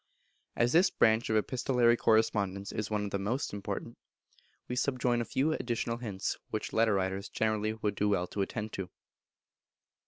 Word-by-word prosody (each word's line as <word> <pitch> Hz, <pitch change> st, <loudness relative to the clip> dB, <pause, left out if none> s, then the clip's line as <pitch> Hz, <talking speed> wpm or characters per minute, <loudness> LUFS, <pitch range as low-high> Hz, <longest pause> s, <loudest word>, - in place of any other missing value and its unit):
As 120 Hz, +1 st, +2 dB
this 180 Hz, +3 st, +6 dB
branch 110 Hz, +1 st, +3 dB
of 110 Hz, -, +2 dB
epistolary 120 Hz, +1 st, +2 dB
correspondence 100 Hz, -4 st, +1 dB
is 105 Hz, -1 st, -3 dB
one 105 Hz, -1 st, -1 dB
of 100 Hz, -, -5 dB
the 100 Hz, -, -1 dB
most 115 Hz, +7 st, -2 dB
important, 100 Hz, -1 st, -5 dB, 0.7 s
we 125 Hz, -, -3 dB
subjoin 125 Hz, -2 st, +1 dB
a -, -, -2 dB
few 140 Hz, +8 st, +1 dB
additional 115 Hz, -3 st, -2 dB
hints 105 Hz, -6 st, -3 dB
which -, -, -4 dB
letter 110 Hz, -2 st, +3 dB
writers 95 Hz, +1 st, -2 dB
generally 110 Hz, -1 st, 0 dB
would 105 Hz, -2 st, -2 dB
do 105 Hz, 0 st, 0 dB
well 95 Hz, -3 st, +1 dB
to 100 Hz, -, -4 dB
attend 105 Hz, +2 st, -3 dB
to. 95 Hz, -2 st, -4 dB
110 Hz, 165 wpm, -31 LUFS, 100-120 Hz, 0.7 s, this